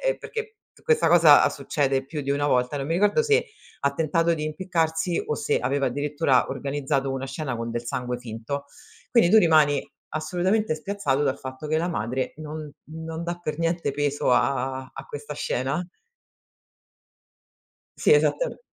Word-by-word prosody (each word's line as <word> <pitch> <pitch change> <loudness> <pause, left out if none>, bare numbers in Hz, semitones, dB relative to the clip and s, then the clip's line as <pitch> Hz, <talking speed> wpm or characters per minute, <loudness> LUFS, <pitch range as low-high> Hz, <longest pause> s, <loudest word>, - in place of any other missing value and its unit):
è - - +1
perché 445 -1 -6 0.3
questa 465 -1 +3
cosa 165 -4 +7
succede 135 -1 -1
più 150 +1 -5
di 140 - -3
una 145 +1 +1
volta, 125 0 +1
non 135 - -3
mi 165 - 0
ricordo 205 - +3
se 450 +1 +3 0.4
ha 140 - +1
tentato 165 +2 +1
di 150 - -4
impiccarsi 165 0 -1
o 150 - 0
se - - 0
aveva 140 +2 0
addirittura 145 0 +1
organizzato 135 0 -2
una 135 0 -3
scena 135 -2 -4
con 115 0 -4
del 120 +1 -4
sangue 125 +1 -3
finto. 125 +4 -5 0.5
Quindi 230 -8 +4
tu 220 - +7
rimani 155 -6 +4 0.3
assolutamente 180 +5 0
spiazzato, 155 -5 -1
dal 140 -2 0
fatto 130 +3 -7
che 155 - +1
la 170 - -1
madre 130 -3 -2
non 155 -1 -7 0.2
non 160 +1 -6
dà 175 0 -3
per 155 -3 -4
niente 165 -1 0
peso 145 -2 0
a 130 0 0
a 135 - -8
questa 145 0 -7
scena. 140 +3 -2 2.1
Sì 445 - +4
esattam - - +2
150 Hz, 160 wpm, -25 LUFS, 135-170 Hz, 2.1 s, cosa